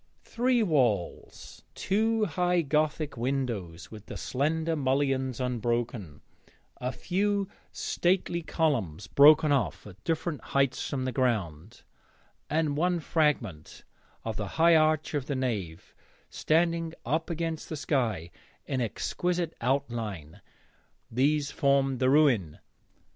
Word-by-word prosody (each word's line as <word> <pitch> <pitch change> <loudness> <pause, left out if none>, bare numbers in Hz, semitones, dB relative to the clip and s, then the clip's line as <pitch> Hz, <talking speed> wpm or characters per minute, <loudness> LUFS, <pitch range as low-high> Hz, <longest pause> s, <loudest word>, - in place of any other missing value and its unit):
Three 245 -1 +1
walls, 125 - -1
two 220 +2 +1
high 180 0 +1
gothic 150 -1 0
windows 115 -10 -3
with 105 -2 -11
the - - -7
slender 160 +5 -1
mullions 135 -2 0
unbroken, 120 - -2 0.6
a 125 +1 -3
few 200 +5 -1 0.2
stately 175 -1 0
columns 120 - -1
broken 150 +1 +6
off 140 -3 0
at 105 -1 -13
different 160 -1 -2
heights 135 -1 0
from 130 -2 -2
the 130 - -1
ground, 110 - -2 0.7
and 155 -2 +1
one 175 +3 +1
fragment 140 - -1 0.4
of 110 -2 -3
the 105 - -3
high 165 +1 +6
arch 155 0 +2
of 145 -3 -2
the 140 - -2
nave 105 -11 -3 0.4
standing 165 0 +1
up 160 +8 -1
against 165 -1 -3
the 155 - -4
sky 120 - -1 0.3
in 130 -2 -2
exquisite 175 +8 -2
outline 115 - -2 0.7
these 145 +4 +1
formed 140 -2 +2
the 130 - +3
ruin. 130 - +3
140 Hz, 115 wpm, -28 LUFS, 120-160 Hz, 0.7 s, broken